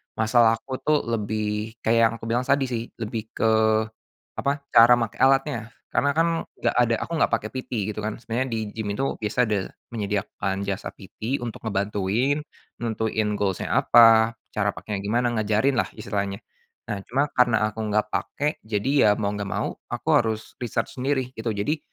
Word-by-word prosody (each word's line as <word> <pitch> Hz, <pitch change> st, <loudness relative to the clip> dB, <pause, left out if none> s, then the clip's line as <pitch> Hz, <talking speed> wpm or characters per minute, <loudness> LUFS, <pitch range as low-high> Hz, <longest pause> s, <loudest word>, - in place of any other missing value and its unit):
masalah 115 Hz, +1 st, +4 dB
aku 130 Hz, +3 st, -7 dB
tuh 150 Hz, -1 st, +1 dB
lebih 105 Hz, 0 st, -2 dB
kayak 115 Hz, +1 st, +3 dB
yang -, -, -4 dB
aku 115 Hz, -, -14 dB
bilang 125 Hz, +2 st, 0 dB
tadi 140 Hz, 0 st, +3 dB
sih 115 Hz, 0 st, -2 dB
lebih 110 Hz, -1 st, -5 dB
ke, 110 Hz, -1 st, +3 dB, 0.8 s
apa 140 Hz, +1 st, -1 dB
cara 115 Hz, +1 st, +8 dB
make 115 Hz, -3 st, 0 dB
alatnya 135 Hz, -4 st, +2 dB, 0.2 s
karena 145 Hz, -, +2 dB
kan 165 Hz, -, +4 dB, 0.3 s
enggak -, -, 0 dB
ada 115 Hz, -1 st, +3 dB
aku -, -, -15 dB
nggak -, -, +2 dB
pakai 110 Hz, -1 st, 0 dB
PT 130 Hz, -, -6 dB, 0.2 s
gitu -, -, -6 dB
kan 110 Hz, -, -2 dB
sebenarnya 125 Hz, +2 st, -1 dB, 0.3 s
gym 110 Hz, -2 st, -3 dB
itu 135 Hz, +6 st, -1 dB, 0.2 s
biasa 105 Hz, +2 st, -3 dB
ada 105 Hz, -1 st, 0 dB, 0.4 s
menyediakan 100 Hz, -2 st, -2 dB
jasa 100 Hz, -1 st, -3 dB
PT 110 Hz, +7 st, -5 dB
untuk 120 Hz, -1 st, -6 dB
ngebantuin, 105 Hz, +6 st, 0 dB, 0.4 s
nentuin 110 Hz, -1 st, -1 dB
goals-nya 95 Hz, -2 st, -1 dB
apa 115 Hz, -1 st, +6 dB, 0.2 s
cara 100 Hz, -1 st, +1 dB
pakainya 100 Hz, -1 st, -4 dB
gimana 120 Hz, +4 st, 0 dB
ngajarinlah, 110 Hz, +4 st, +1 dB
istilahnya 100 Hz, -2 st, -3 dB, 0.5 s
nah 100 Hz, -, -4 dB
cuma 140 Hz, +3 st, 0 dB
karena 115 Hz, -4 st, +3 dB
aku 110 Hz, -, -10 dB
enggak 105 Hz, -1 st, 0 dB
pakai 145 Hz, +1 st, -1 dB
jadi 110 Hz, +3 st, -2 dB, 0.2 s
ya -, -, +6 dB
mau 100 Hz, -1 st, -1 dB
enggak 105 Hz, -1 st, -4 dB
mau -, -, -2 dB, 0.2 s
aku -, -, -6 dB
harus 110 Hz, -1 st, -2 dB
riset 120 Hz, -3 st, -1 dB
sendiri 130 Hz, -1 st, -1 dB
gitu 110 Hz, -2 st, -3 dB
jadi, 145 Hz, +11 st, -1 dB
110 Hz, 165 wpm, -24 LUFS, 105-120 Hz, 0.8 s, cara